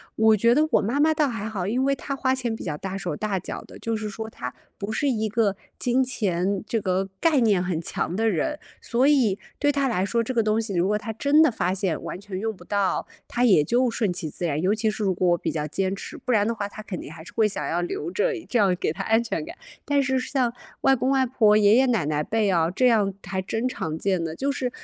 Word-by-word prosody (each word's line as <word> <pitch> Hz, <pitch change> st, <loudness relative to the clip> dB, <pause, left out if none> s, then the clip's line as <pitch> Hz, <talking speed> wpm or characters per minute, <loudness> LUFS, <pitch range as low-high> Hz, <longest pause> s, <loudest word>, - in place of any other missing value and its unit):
我 220 Hz, 0 st, +5 dB
觉 235 Hz, +3 st, +4 dB
得 305 Hz, +4 st, +3 dB
我 -, -, +4 dB
妈 235 Hz, +8 st, -1 dB
妈 315 Hz, +2 st, +4 dB
倒 305 Hz, -1 st, +2 dB
还 225 Hz, -3 st, -4 dB
好， 200 Hz, -5 st, -3 dB
因 245 Hz, +7 st, 0 dB
为 275 Hz, 0 st, +2 dB
她 275 Hz, +1 st, -5 dB
花 260 Hz, -1 st, +1 dB
钱 245 Hz, -3 st, -1 dB
比 225 Hz, -, -6 dB
较 155 Hz, -4 st, -2 dB
大 190 Hz, +5 st, -5 dB
手 180 Hz, -2 st, -3 dB
大 210 Hz, -3 st, -2 dB
脚 180 Hz, -, -6 dB
的， -, -, -13 dB
就 230 Hz, 0 st, -2 dB
是 215 Hz, -1 st, -3 dB
说 220 Hz, +2 st, -6 dB
她 125 Hz, -, -6 dB, 0.2 s
不 200 Hz, +1 st, -4 dB
是 285 Hz, +6 st, 0 dB
一 220 Hz, -4 st, 0 dB
个 210 Hz, -2 st, +1 dB, 0.2 s
金 250 Hz, +1 st, +2 dB
钱 195 Hz, -6 st, 0 dB
这 230 Hz, -3 st, -1 dB
个 190 Hz, 0 st, 0 dB
概 320 Hz, -4 st, +4 dB
念 205 Hz, -7 st, +3 dB
很 175 Hz, -3 st, -2 dB
强 170 Hz, -, -2 dB
的 225 Hz, +4 st, +1 dB
人， 215 Hz, -, -1 dB, 0.2 s
所 250 Hz, +3 st, +2 dB
以 245 Hz, -10 st, +3 dB, 0.2 s
对 290 Hz, 0 st, +2 dB
她 280 Hz, -1 st, +1 dB
来 195 Hz, -7 st, 0 dB
说， 230 Hz, +4 st, +1 dB
这 230 Hz, +3 st, -3 dB
个 230 Hz, -2 st, +2 dB
东 215 Hz, +1 st, +1 dB
西 215 Hz, -4 st, -4 dB
如 175 Hz, +1 st, +2 dB
果 210 Hz, +2 st, +1 dB
她 220 Hz, +1 st, -5 dB
真 285 Hz, +7 st, +4 dB
的 315 Hz, -, +6 dB
发 185 Hz, -6 st, -1 dB
现 190 Hz, -5 st, -1 dB
完 -, -, -5 dB
全 200 Hz, -1 st, -7 dB
用 220 Hz, +3 st, -2 dB
不 -, -, -15 dB
到， 200 Hz, -2 st, 0 dB, 0.2 s
她 245 Hz, +1 st, 0 dB
也 190 Hz, -10 st, +5 dB
就 245 Hz, -, +2 dB
顺 225 Hz, -4 st, 0 dB
其 175 Hz, -3 st, -3 dB
自 175 Hz, -, -5 dB
然。 150 Hz, -3 st, 0 dB
尤 190 Hz, +4 st, +2 dB
其 220 Hz, 0 st, +1 dB
是 215 Hz, -, -6 dB
如 195 Hz, -2 st, +2 dB
果 180 Hz, 0 st, +1 dB
我 175 Hz, -, +3 dB
比 -, -, -3 dB
较 150 Hz, -2 st, -2 dB
坚 190 Hz, +5 st, -1 dB
持， -, -, -8 dB
不 -, -, -12 dB
然 205 Hz, -2 st, +3 dB
的 230 Hz, -, 0 dB
话 205 Hz, -3 st, -3 dB
她 215 Hz, +1 st, -10 dB
肯 190 Hz, -4 st, -5 dB
定 -, -, -8 dB
还 160 Hz, +1 st, -10 dB
是 -, -, -12 dB
会 220 Hz, -2 st, +3 dB
想 150 Hz, -8 st, -3 dB
要 170 Hz, +4 st, -1 dB
留 175 Hz, -1 st, -4 dB
着， 475 Hz, -, +1 dB, 0.2 s
这 245 Hz, -, +2 dB
样 195 Hz, -3 st, +3 dB
给 175 Hz, -, -1 dB
她 160 Hz, -, -5 dB
安 225 Hz, +1 st, +3 dB
全 235 Hz, -, -3 dB
感。 335 Hz, +2 st, -9 dB, 0.3 s
但 285 Hz, -2 st, +2 dB
是 265 Hz, 0 st, +1 dB
像 255 Hz, -2 st, 0 dB, 0.3 s
外 270 Hz, -, +5 dB
公 260 Hz, 0 st, 0 dB
外 270 Hz, -1 st, +3 dB
婆、 230 Hz, -4 st, +4 dB
爷 210 Hz, 0 st, +5 dB
爷 265 Hz, -, +5 dB
奶 230 Hz, -, +1 dB
奶 150 Hz, -1 st, 0 dB
辈 215 Hz, +5 st, 0 dB
啊， 165 Hz, -2 st, +2 dB
这 250 Hz, +8 st, +2 dB
样 210 Hz, -5 st, +3 dB
还 190 Hz, +1 st, -2 dB
真 225 Hz, +5 st, -3 dB
常 160 Hz, -10 st, -4 dB
见 190 Hz, 0 st, 0 dB
的， 160 Hz, -1 st, -4 dB
就 275 Hz, +9 st, -1 dB
是， 260 Hz, -2 st, -2 dB
215 Hz, 290 characters per minute, -24 LUFS, 185-245 Hz, 0.3 s, 的